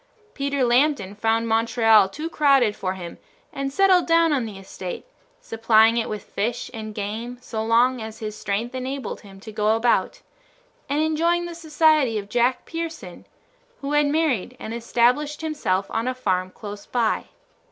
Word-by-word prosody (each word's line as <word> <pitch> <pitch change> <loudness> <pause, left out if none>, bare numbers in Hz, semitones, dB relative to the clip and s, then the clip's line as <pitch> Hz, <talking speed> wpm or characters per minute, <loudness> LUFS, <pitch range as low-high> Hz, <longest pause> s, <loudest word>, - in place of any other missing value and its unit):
Peter 280 -1 -1
Lambton 245 -4 +2
found 225 +2 0
Montreal 225 -2 +4
too 300 +11 -5
crowded 275 -9 +3
for 185 -1 -3
him 175 -2 -8 0.3
and 275 0 -3
settled 375 +2 +4
down 330 -1 +4
on 260 -5 0
the 210 -3 -8
estate, 190 - -7 0.4
supplying 225 - +3
it 235 -1 -1
with 210 - -5
fish 230 +4 -3
and 215 -2 -7
game 225 +4 -4
so 225 -3 -4
long 240 +2 +3
as 220 0 -7
his 215 -1 -6
strength 215 +4 -3
enabled 260 +1 -5
him 195 -2 -14
to 220 - -9
go 215 +1 +1
about, 240 - +1 0.7
and 295 +2 +1
enjoying 335 +2 +1
the 345 - -6
society 310 -6 +2
of 200 -1 -6
Jack 245 +3 +1
Pearson, 325 - -7 0.5
who 280 +1 -4
had 295 0 +3
married 285 - 0
and 220 - -6
established 245 +6 +1
himself 290 -12 -1
on 230 +2 -1
a 255 - -1
farm 185 -7 -1
close 205 +1 -9
by. 235 -3 0
235 Hz, 165 wpm, -23 LUFS, 215-290 Hz, 0.7 s, Montreal